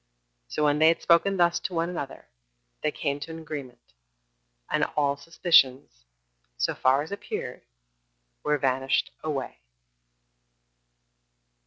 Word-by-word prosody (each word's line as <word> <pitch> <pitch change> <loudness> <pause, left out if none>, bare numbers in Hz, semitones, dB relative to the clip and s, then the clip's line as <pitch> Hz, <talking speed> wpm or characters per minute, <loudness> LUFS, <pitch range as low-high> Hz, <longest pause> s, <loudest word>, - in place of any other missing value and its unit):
So 150 - -2
when 150 0 +3
they 160 - +6
had 165 0 +3
spoken 175 +4 +4
thus 175 -1 +3
to 180 - -4
one 165 0 +1
another, 155 -6 -6 0.6
they - - +1
came 140 0 -2
to 145 - -7
an 160 - -6
agreement, 140 - -8 0.7
and - - +1
all 140 -1 +2
suspicions, 135 - +2 0.5
so - - 0
far 135 +2 +2
as 160 - -11
appeared, 200 - -5 0.8
were 150 0 +1
vanished 135 0 +1
away. 140 - -4
150 Hz, 125 wpm, -27 LUFS, 135-165 Hz, 0.8 s, they